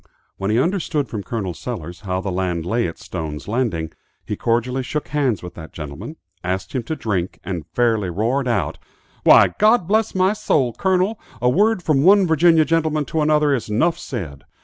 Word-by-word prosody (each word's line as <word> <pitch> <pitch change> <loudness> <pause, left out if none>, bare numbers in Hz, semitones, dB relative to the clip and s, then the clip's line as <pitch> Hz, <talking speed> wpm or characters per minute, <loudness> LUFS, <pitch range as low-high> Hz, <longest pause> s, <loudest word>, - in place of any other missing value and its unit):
When 95 +1 -2
he 110 - +2
understood 165 -1 0
from 110 - -4
Col. 100 -4 -4
Sellers. 90 -6 -6
how 95 -2 -3
the 95 - -3
land 90 -2 -2
lay 115 +3 0
at 85 - -7
Stone's 80 -4 -6
Landing, 105 -9 -1 0.3
he - - -3
cordially 120 +3 0
shook 150 +4 -4
hands 130 - 0
with 90 -1 -8
that 80 -2 -11
gentleman, 80 - -7 0.3
asked 95 +2 -3
him 130 - 0
to 160 - -3
drink, 95 - -3
and 90 -6 -5
fairly 110 -6 +2
roared 120 +9 0
out, 120 - -1 0.4
"Why, - - +7
God 215 -4 +4
bless 215 +1 +1
my 190 +2 +3
soul, 135 - +1
Colonel, 190 - +1 0.2
a 125 - +2
word 205 - +2
from 150 -5 +2
one 195 +4 +6
Virginia 160 -1 +4
gentleman 155 -2 +1
to 160 +3 -1
another 150 -1 +3
is 120 -5 -2
'nuff 160 +11 +1
ced.' 85 - -6
120 Hz, 185 wpm, -21 LUFS, -, 0.4 s, Why